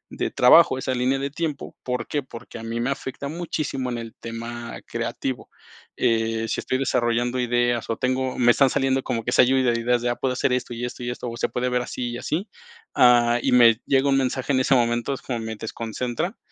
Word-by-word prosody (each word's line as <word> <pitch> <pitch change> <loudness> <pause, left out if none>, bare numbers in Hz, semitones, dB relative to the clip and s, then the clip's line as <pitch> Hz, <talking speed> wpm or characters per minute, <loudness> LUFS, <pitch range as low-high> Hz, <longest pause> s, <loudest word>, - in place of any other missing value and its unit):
de - - -1
trabajo, 130 +2 +6
esa 130 0 -2
línea 130 +2 +1
de 140 0 -3
tiempo. 150 -2 -4
¿Por 125 0 -3
qué? 145 - -1
Porque 115 -2 -10
a - - -9
mí 115 +1 -3
me 125 +3 0
afecta 140 +1 -5
muchísimo 155 -5 -3
en 120 - -3
el 115 -1 -7
tema 115 +1 -6
creativo. 120 +2 -4 0.5
Eh, 115 0 +1
si 110 - -2
estoy 130 - -1
desarrollando 120 -1 0
ideas 120 -1 0
o 115 - -1
tengo 130 0 -1
me 120 -1 +5
están 135 +2 +4
saliendo 135 +1 +1
como 115 -2 -2
que 120 - -2
esa - - +6
ayuda 130 -1 +3
de 115 - -1
ideas 120 0 +1
de 120 - +1
ah, 120 - 0
puedo 130 0 -1
hacer 125 0 0
esto 125 -1 -2
y 120 +1 -3
esto 125 0 -7
y 120 - -3
esto, 120 0 -5
o 115 - -7
se - - -1
puede 125 +1 -1
ver 125 0 0
así 125 -1 -4
y 120 - -5
así, 175 - -3 0.5
ah, 120 -1 +5
y - - 0
me 120 -2 +6
llega 135 +1 +3
un 135 - +3
mensaje 130 +1 -1
en 130 - +3
ese 135 - +3
momento, 120 +2 +1
es 135 - -6
como 120 -3 -3
me 110 0 -5
desconcentra. 120 - -4
125 Hz, 230 wpm, -23 LUFS, 120-130 Hz, 0.5 s, trabajo